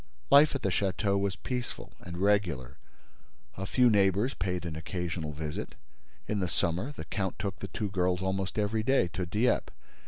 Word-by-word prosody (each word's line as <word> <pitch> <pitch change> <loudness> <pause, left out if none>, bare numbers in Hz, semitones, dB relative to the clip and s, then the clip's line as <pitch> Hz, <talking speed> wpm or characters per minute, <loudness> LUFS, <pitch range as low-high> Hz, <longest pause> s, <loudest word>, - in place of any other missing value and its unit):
Life 145 +1 +7
at 140 - -3
the 95 - +2
château 100 +2 +1
was 100 -1 0
peaceful 125 -2 -5
and 85 0 -7
regular. 90 -10 +1 0.8
A 95 +1 -4
few 125 +5 +4
neighbors 100 +3 +3
paid 90 -2 -2
an 80 -2 -4
occasional 80 -1 -3
visit. 75 0 -5 0.5
In 105 - 0
the 90 - 0
summer, 85 - 0
the 130 - -8
count 95 +2 -2
took 95 -3 -3
the 100 - -5
two 105 +1 -3
girls 90 -2 +1
almost 95 +1 -1
every 105 +1 +1
day 125 -6 +3
to 90 +2 -3
Dieppe. 110 +7 +1
95 Hz, 175 wpm, -30 LUFS, 90-105 Hz, 0.8 s, Life